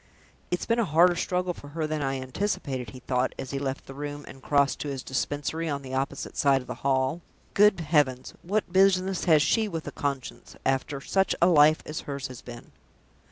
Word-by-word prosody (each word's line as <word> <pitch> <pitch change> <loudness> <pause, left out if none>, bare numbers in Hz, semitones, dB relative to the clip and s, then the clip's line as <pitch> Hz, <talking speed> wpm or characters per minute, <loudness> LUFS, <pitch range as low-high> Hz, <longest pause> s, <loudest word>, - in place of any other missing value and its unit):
"It's 180 - -2
been 230 0 +1
a - - +3
harder 175 +2 +5
struggle 180 +1 -1
for 145 - -12
her 155 +2 -3
than 155 0 -2
I 135 -1 -1
anticipated," 130 - -3
he 130 - -11
thought, 125 0 -1
as 130 - -6
he 140 - -2
left 135 -1 -3
the 135 - -9
room, 145 +1 -6
and 135 - -11
crossed 140 0 +2
to - - -4
his 135 -2 -4
Dispensary 145 +5 -2
on 140 -1 -3
the 130 0 -8
opposite 135 +1 -3
side 140 -2 +3
of - - -12
the - - -5
hall. 135 +4 +1 0.3
"Good 205 -3 +5
heavens, 145 -5 +1
what 200 0 -2
business 190 -1 +3
has 155 -4 +5
she 220 +5 +2
with 165 -5 -5
a - - -5
conscience, 140 -3 -4
after 135 +1 0
such 190 +6 +1
a - - +5
life 155 -3 +5
as 155 - -4
hers 140 -2 -4
has 130 - -9
been!" 120 -1 -11
145 Hz, 205 wpm, -27 LUFS, 135-175 Hz, 0.3 s, harder